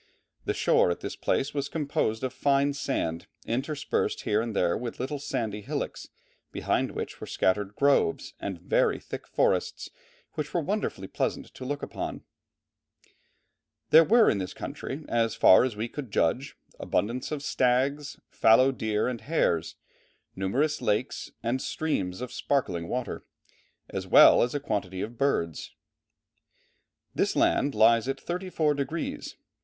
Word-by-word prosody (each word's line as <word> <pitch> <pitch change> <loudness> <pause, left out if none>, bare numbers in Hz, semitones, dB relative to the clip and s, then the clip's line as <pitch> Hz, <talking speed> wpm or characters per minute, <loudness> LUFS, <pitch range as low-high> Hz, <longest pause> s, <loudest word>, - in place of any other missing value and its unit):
The - - -1
shore - - +3
at 85 - -2
this - - -5
place 135 - -1
was 140 -1 -2
composed 140 -7 -1
of 130 - -2
fine 140 0 +2
sand 85 -12 -2 0.2
interspersed 135 +6 -1
here 105 +1 +1
and 115 -2 -4
there 85 -2 +2
with 120 -1 -5
little 140 +3 -3
sandy 110 -6 -3
hillocks, - - -4 0.4
behind - - 0
which - - -6
were - - -6
scattered 100 +2 0
"groves 140 -11 +2
and 95 -4 -5
very 85 - +1
thick - - -8
forests - - 0 0.4
which - - -5
were - - +3
wonderfully - - -2
pleasant - - -3
to 130 - -8
look 145 +2 -3
upon." - - -5 1.7
There 160 +1 +9
were 225 +6 +5
in 100 - +2
this 95 -1 -5
country, 145 +3 -6
as 115 -1 +1
far 95 - +7
as 125 -4 -1
we 110 +3 -3
could 135 0 -7
judge, 110 +8 0 0.2
abundance 120 +7 -1
of 145 -2 -3
stags, 140 +1 0
fallow 130 +4 +5
deer 110 -4 -1
and 125 -3 -3
hares, 135 - 0 0.6
numerous 135 +12 0
lakes, 110 +1 -1
and 120 +3 0
streams 100 -12 -2
of 125 -1 -6
sparkling 90 -13 -1
water, 125 +4 -4 0.6
as - - -5
well - - +8
as 120 +3 0
a - - 0
quantity 100 -8 -3
of 115 +3 -6
birds. 85 - -1 1.4
This - - 0
land 140 -2 +2
lies 115 +2 +5
at 135 0 -2
34 175 -4 -1
degrees. 145 +4 -4
125 Hz, 145 wpm, -27 LUFS, 105-140 Hz, 1.7 s, There